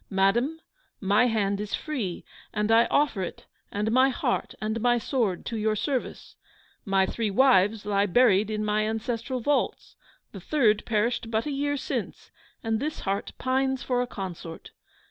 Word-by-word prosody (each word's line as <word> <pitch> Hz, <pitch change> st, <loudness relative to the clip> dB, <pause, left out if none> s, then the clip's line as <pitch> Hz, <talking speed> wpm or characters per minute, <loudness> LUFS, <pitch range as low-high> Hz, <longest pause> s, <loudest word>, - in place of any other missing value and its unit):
Madam, 235 Hz, +11 st, +1 dB, 0.4 s
my 205 Hz, +5 st, +3 dB
hand 200 Hz, -3 st, 0 dB
is 210 Hz, -1 st, -2 dB
free, 240 Hz, -, -4 dB, 0.3 s
and 210 Hz, 0 st, 0 dB
I 230 Hz, +1 st, +6 dB
offer 285 Hz, -9 st, +1 dB
it, 180 Hz, -, -6 dB, 0.3 s
and 210 Hz, +2 st, -1 dB
my 260 Hz, +3 st, +5 dB
heart 255 Hz, -, -2 dB
and 220 Hz, +1 st, -2 dB
my 240 Hz, 0 st, +3 dB
sword 230 Hz, -7 st, -1 dB
to 230 Hz, -, -3 dB
your 215 Hz, 0 st, +1 dB
service! 260 Hz, +4 st, -3 dB, 0.5 s
My 195 Hz, -2 st, +3 dB
three 225 Hz, +1 st, -2 dB
wives 210 Hz, -2 st, +4 dB
lie 200 Hz, 0 st, +2 dB
buried 210 Hz, 0 st, +4 dB
in 215 Hz, 0 st, -2 dB
my 210 Hz, 0 st, +1 dB
ancestral 230 Hz, +3 st, -3 dB
vaults. 290 Hz, +4 st, -1 dB, 0.3 s
The -, -, -9 dB
third 225 Hz, -9 st, +2 dB
perished 230 Hz, +1 st, 0 dB
but 225 Hz, 0 st, 0 dB
a 300 Hz, -, -2 dB
year 285 Hz, +1 st, -1 dB
since; -, -, -5 dB, 0.3 s
and 225 Hz, -1 st, 0 dB
this 300 Hz, +4 st, -3 dB
heart 195 Hz, 0 st, -2 dB
pines 265 Hz, 0 st, 0 dB
for 250 Hz, -1 st, 0 dB
a 250 Hz, -, -2 dB
consort! 175 Hz, -6 st, -7 dB
225 Hz, 165 wpm, -26 LUFS, 205-255 Hz, 0.5 s, I